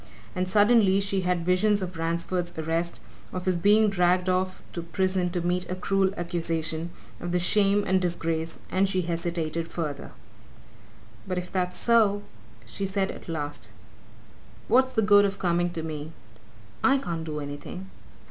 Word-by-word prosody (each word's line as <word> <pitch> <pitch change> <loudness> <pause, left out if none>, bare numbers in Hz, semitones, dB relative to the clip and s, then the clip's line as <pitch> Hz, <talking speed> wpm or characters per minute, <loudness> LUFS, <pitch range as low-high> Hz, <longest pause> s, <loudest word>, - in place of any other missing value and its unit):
And 185 0 -1
suddenly 205 -1 +5
she 195 -1 0
had 180 -2 0
visions 200 +3 +3
of 185 -2 -5
Ransford's 170 +2 -2
arrest, 165 +2 -1 0.3
of 185 0 -5
his 185 -2 +1
being 210 +4 +5
dragged 180 -1 +2
off 185 0 -1
to 170 - -3
prison 180 +2 0
to 175 0 -2
meet 180 +1 -1
a 185 - -2
cruel 190 +1 +1
accusation, 165 -1 -1 0.3
of 175 - -4
the 180 - +2
shame 200 +3 +3
and 190 0 +2
disgrace, 165 -2 -2
and 190 +1 +2
she 185 -1 0
hesitated 170 -1 -2
further. 150 -5 -4 1.2
"But 185 -1 -2
if 180 0 -4
that's 180 -1 -1
so," 215 -3 +3 0.4
she 195 +12 -4
said 195 0 -1
at - - -11
last, 145 -7 -4 1.0
"what's 260 +2 +3
the 220 - +2
good 205 0 +6
of 200 -1 0
coming 175 -1 +1
to 170 -2 -5
me? 155 0 -6 0.7
I 275 +1 +5
can't 170 -11 -4
do 155 -2 -4
anything!" 145 +6 -7
180 Hz, 155 wpm, -26 LUFS, 165-195 Hz, 1.2 s, good